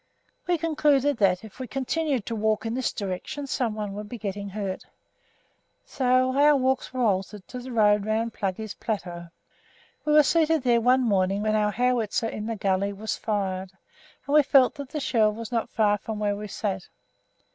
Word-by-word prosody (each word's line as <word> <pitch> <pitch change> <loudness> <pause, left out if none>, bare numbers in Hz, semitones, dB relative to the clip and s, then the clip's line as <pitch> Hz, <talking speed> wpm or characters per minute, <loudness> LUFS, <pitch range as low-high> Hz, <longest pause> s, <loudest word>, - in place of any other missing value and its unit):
We 355 -1 +2
concluded 295 -4 +2
that, 190 -3 +2
if 220 +2 -13
we 255 - -5
continued 270 -2 -1
to 230 - -3
walk 215 0 0
in 225 - -2
this 255 0 -1
direction 205 +9 -5
someone 215 -6 -2
would 205 +1 -7
be 240 - -6
getting 200 -2 -5
hurt, 195 -2 -4 1.0
so 255 0 +1
our 295 +1 +6
walks 260 -1 0
were 255 -1 -1
altered 195 -1 -1
to 250 - -6
the 255 +1 -8
road 210 -3 +3
round 220 +2 -1
"Pluggey's 205 +2 -3
Plateau." 175 -6 -5 0.8
We 300 - +1
were 300 0 +7
seated 320 0 +2
there 240 -2 +3
one 250 +3 +4
morning 195 -2 +1
when 215 0 +1
our 210 -1 +2
howitzer 230 0 0
in 215 0 -5
the 230 - -2
gully 195 0 0
was 215 +2 -3
fired, 190 -3 -3 0.5
and 280 - -3
we 300 - +8
felt 270 -2 +4
that 280 -3 -8
the 305 - -4
shell 225 -6 +2
was 230 +2 -7
not 230 -2 -1
far 210 -2 +2
from 220 +2 -5
where 205 -1 0
we 210 +1 -6
sat. 195 -2 -3
220 Hz, 185 wpm, -26 LUFS, 205-260 Hz, 1.0 s, we